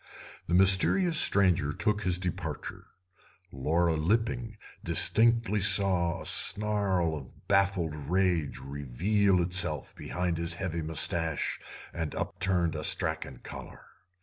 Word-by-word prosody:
The 85 - 0
mysterious 100 - +6
stranger 90 -7 +2
took 105 +7 -2
his 90 -3 +1
departure; 90 -4 -6 0.6
Laura 80 +5 -1
Lipping 115 +6 -2 0.3
distinctly 115 -2 +2
saw 95 -3 +2
a - - -14
snarl 100 -6 +2
of 65 -4 -13
baffled 95 -5 0
rage 80 0 -2
reveal 70 - -1
itself 85 -5 -2
behind 90 -2 -4
his 85 0 -2
heavy 85 -3 -5
moustache 80 0 -1 0.3
and 80 -3 -5
upturned 90 -3 -2
astrachan 65 - -1
collar. - - -11
90 Hz, 105 wpm, -27 LUFS, 80-100 Hz, 0.6 s, mysterious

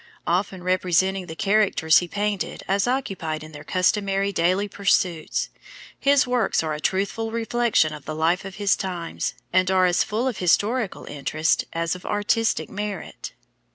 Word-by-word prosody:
Often 185 +1 -1
representing 185 +1 +1
the 160 - -7
characters 200 -5 +3
he 175 - -4
painted 200 -3 -2
as 200 +3 +1
occupied 190 -12 -2
in 155 - -11
their 145 -1 -10
customary 195 +3 +1
daily 185 +3 +1
pursuits, 185 -4 0 0.5
his 280 0 +4
works 250 -8 +1
are 155 -1 -2
a 150 - -4
truthful 200 +6 -1
reflection 230 -7 +1
of 150 -2 -10
the 155 - -4
life 165 +4 +1
of 195 0 -8
his 205 -1 +2
times, 180 -3 -4 0.2
and 185 0 +3
are 185 -1 +4
as 180 -1 +3
full 220 +4 -1
of 245 -6 -2
historical 205 +5 +1
interest 155 +3 0
as 165 0 -1
of 180 0 -8
artistic 220 +2 0
merit. 205 -2 -6
190 Hz, 155 wpm, -24 LUFS, 170-210 Hz, 0.5 s, his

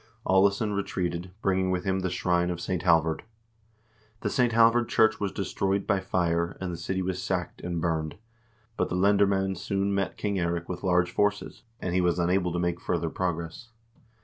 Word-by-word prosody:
Aalesson 100 +2 +3
retreated, 90 -3 -2
bringing 95 -1 +2
with 90 -1 -1
him 95 -1 0
the 95 0 -1
shrine 90 -1 +1
of 85 -1 -3
St. 90 0 -2
Halvard. 80 -3 +3 1.0
The - - -1
St. 125 -3 +2
Halvard 115 +1 +4
church 110 -1 +3
was 100 -2 -1
de 100 - -3
stroyed 95 +2 -1
by 100 -3 +2
fire 85 -2 0
and 90 -2 -3
the - - -5
city 95 +2 -2
was 90 0 -2
sacked 90 -1 -3
and 85 -1 -3
burned, 80 -2 -1 0.6
but - - 0
the - - -2
lender 100 +2 +4
mcend 95 -1 0
soon 100 +1 -1
met 100 -1 -1
King 100 -2 -1
Eirik 85 -1 -1
with 90 - -5
large 90 -2 +2
forces, 105 0 -1 0.2
and 90 - -3
he 90 - +3
was 90 -1 +2
unable 90 +1 +1
to 90 - -2
make 85 0 -1
further 85 -2 -1
progress. 85 +5 -3
90 Hz, 190 wpm, -27 LUFS, 85-100 Hz, 1.0 s, Halvard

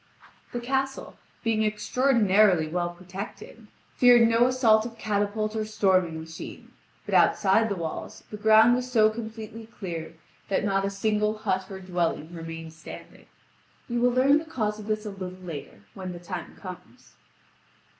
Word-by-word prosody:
The 240 - -3
castle, 270 +2 -2 0.3
being 225 -2 +1
extraordinarily 210 - +3
well 175 +2 -1
protected, 190 +5 -9 0.3
feared 245 -2 +7
no 230 +2 +4
assault 235 -4 +4
of 230 0 -8
catapult 215 +1 -1
or 220 - 0
storming 185 -6 +1
machine; 160 0 -9 0.3
but - - -5
outside 215 +2 +4
the 200 - -1
walls 165 -3 -6
the 210 - -5
ground 220 +2 +6
was 250 0 -2
so 220 -3 +5
completely 220 0 -8
cleared 170 -7 -7 0.3
that 200 - +1
not 195 -1 +1
a - - 0
single 210 +1 0
hut 190 -3 -2
or 190 -1 -7
dwelling 175 -3 -2
remained 165 -1 -7
standing. 160 - -12 0.6
You 240 -1 -1
will 245 - +5
learn 265 +4 +4
the 320 - -8
cause 215 -9 -2
of 210 - -9
this 215 0 -1
a 210 - -4
little 185 -2 -7
later, 165 - -8
when 185 -1 -6
the 175 - -8
time 175 0 -7
comes. 180 - -11
210 Hz, 155 wpm, -26 LUFS, 185-225 Hz, 0.6 s, feared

